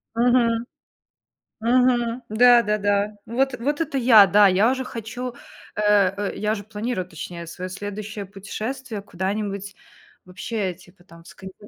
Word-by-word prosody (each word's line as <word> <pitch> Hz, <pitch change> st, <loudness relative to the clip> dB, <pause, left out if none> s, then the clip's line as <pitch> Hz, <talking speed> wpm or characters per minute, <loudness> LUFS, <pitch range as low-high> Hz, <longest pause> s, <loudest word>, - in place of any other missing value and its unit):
Мгм. 235 Hz, -1 st, +2 dB, 1.0 s
Мгм. 240 Hz, 0 st, +2 dB
Да-да-да, 210 Hz, -3 st, +3 dB
вот 265 Hz, +3 st, 0 dB
вот 290 Hz, +6 st, -2 dB
это 290 Hz, -4 st, -1 dB
я, 225 Hz, -5 st, +7 dB
да, 205 Hz, +2 st, +5 dB
я 195 Hz, +6 st, +4 dB
уже 260 Hz, 0 st, -2 dB
хочу, 240 Hz, +1 st, -6 dB, 0.4 s
э, 210 Hz, -, -2 dB, 0.3 s
э, 205 Hz, 0 st, -3 dB
я 210 Hz, 0 st, -1 dB
уже 205 Hz, -2 st, -4 dB
планирую, 215 Hz, -1 st, -4 dB
точнее, 170 Hz, +1 st, -8 dB
своё 185 Hz, +2 st, -6 dB
следующее 205 Hz, +1 st, -6 dB
путешествие 215 Hz, +4 st, -6 dB
куда-нибудь 200 Hz, +1 st, -4 dB, 0.5 s
вообще, 190 Hz, +1 st, -4 dB
типа 180 Hz, 0 st, -20 dB
там 170 Hz, -2 st, -16 dB
в -, -, -20 dB
Сканди 190 Hz, -1 st, -11 dB
210 Hz, 135 wpm, -23 LUFS, 195-240 Hz, 1.0 s, я